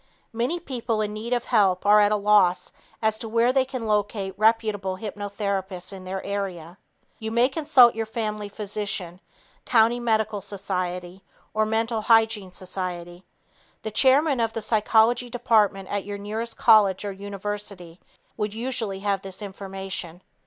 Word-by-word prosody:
Many 245 +10 -1
people 240 -8 -3
in 210 0 -2
need 220 +3 -6
of 245 -1 0
help 195 -6 +2
are 210 +1 +7
at 205 0 +3
a - - +3
loss 205 -3 +3 0.3
as 220 0 +1
to 225 - -6
where 235 +3 +2
they 265 -1 +4
can 255 -3 -5
locate 205 -2 -1
reputable 215 -3 +1
hypnotherapists 200 -2 -4
in 190 -1 -9
their 190 +1 -4
area. 190 -3 -5 0.4
You 220 - -4
may 235 +3 +3
consult 275 -4 +5
your 225 0 -3
family 215 -2 -3
physician, 200 -4 -4 0.4
county 230 0 +3
medical 220 -3 0
society 185 -2 -4 0.3
or 215 0 +1
mental 225 +1 0
hygiene 220 -3 +3
society. 180 -1 -6 0.6
The 220 - -4
chairman 270 +4 +4
of 225 -1 0
the 225 - -3
psychology 225 +2 +3
department 215 -5 +2
at 205 -1 -2
your 205 0 -6
nearest 220 +3 -4
college 210 -4 +5
or 200 - -2
university 200 -3 -6 0.4
would 210 0 -3
usually 225 -5 -3
have 200 -2 0
this 190 -1 -8
information. 190 -3 -6
210 Hz, 150 wpm, -24 LUFS, 195-225 Hz, 0.6 s, are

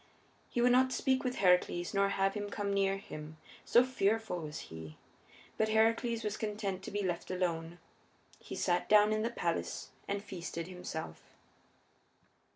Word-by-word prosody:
He 240 - 0
would 245 +1 +5
not 260 +1 +5
speak 260 0 +1
with 255 -1 -1
Heracles 180 -3 +2
nor 200 0 +3
have 195 0 +1
him 205 0 -4
come 200 -1 -2
near 195 0 +2
him, 155 -5 -9 0.3
so 240 - +6
fearful 225 -6 0
was 150 -2 -6
he. 80 -1 -9 0.6
But 220 0 +3
Heracles 230 +1 +2
was 210 -1 -2
content 205 -3 -3
to - - -7
be 205 0 -2
left 175 -2 -2
alone. 170 -2 -2 0.6
He - - -8
sat 175 -1 0
down 210 0 +6
in 215 - 0
the 230 - 0
palace 170 -8 -2 0.2
and 200 0 -2
feasted 175 -4 -5
himself. 180 - -6
200 Hz, 160 wpm, -33 LUFS, 175-220 Hz, 0.6 s, so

